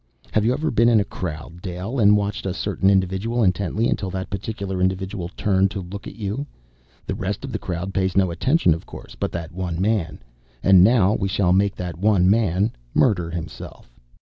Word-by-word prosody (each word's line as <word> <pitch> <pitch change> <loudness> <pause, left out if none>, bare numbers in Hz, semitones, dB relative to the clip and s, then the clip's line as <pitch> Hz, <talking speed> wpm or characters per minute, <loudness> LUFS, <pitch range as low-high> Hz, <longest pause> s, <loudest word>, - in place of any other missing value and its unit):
"Have 110 - +2
you 115 - +3
ever 155 +5 -1
been 115 +1 +4
in 115 -2 +5
a - - +2
crowd, 85 -2 -6
Dale, 95 +7 -4
and 105 -1 +6
watched 100 -1 -2
a 95 - -2
certain 95 -1 +1
individual 100 +5 +1
intently, 100 +3 +1
until 95 - -1
that 95 0 -5
particular 100 -1 -4
individual 95 -1 -1
turned 95 -1 +2
to 100 - -5
look 100 +3 -8
at - - -9
you? 110 +6 -4 0.6
The - - -3
rest - - -3
of - - -6
the - - -3
crowd 90 +2 -4
pays 95 -1 0
no 95 -3 +3
attention, 130 - +2
of 80 - -7
course, - - -11
but - - -3
that 85 -2 -5
one 90 -1 -4
man. 95 -5 0 0.5
And 95 -2 +7
now 105 -2 +4
we 95 - -1
shall 95 -2 +2
make 100 +1 +2
that 90 -2 -6
one 100 -2 +3
man 105 -1 +2 0.2
murder 90 -9 +2
himself!" 80 -6 -8
95 Hz, 200 wpm, -22 LUFS, 90-105 Hz, 0.6 s, And